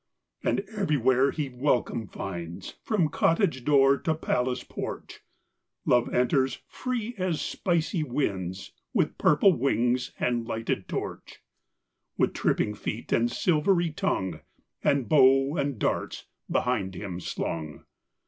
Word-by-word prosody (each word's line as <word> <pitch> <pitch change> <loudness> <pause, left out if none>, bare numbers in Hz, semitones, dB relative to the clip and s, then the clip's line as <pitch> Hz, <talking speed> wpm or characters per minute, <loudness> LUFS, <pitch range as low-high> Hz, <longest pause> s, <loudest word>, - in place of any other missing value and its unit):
And - - +1
everywhere 135 - +3
he 150 -1 -2
welcome 125 -3 0
finds, 85 -1 -6
From 205 -8 +1
cottage 165 - +1
door 140 0 +5
to 160 - 0
palace 125 -4 -1
porch - - -6 0.7
Love 120 -1 +3
enters 130 +2 +2
free 245 -2 -3
as 180 -4 0
spicy 170 -1 0
winds, 100 - -2 0.2
With - - +1
purple 185 +6 +5
wings 125 -2 +1
and 120 -2 0
lighted 115 -1 -2
torch, - - -6 0.7
With - - +2
tripping 105 - +1
feet 105 +2 -5
and 120 +1 +3
silvery 170 0 +2
tongue, 150 - -1 0.4
And 140 -4 +2
bow 135 0 +5
and 140 -5 -1
darts - - -2 0.2
behind 100 -7 0
him 90 -2 -5
slung. 80 -4 -4
130 Hz, 120 wpm, -27 LUFS, 115-155 Hz, 0.7 s, door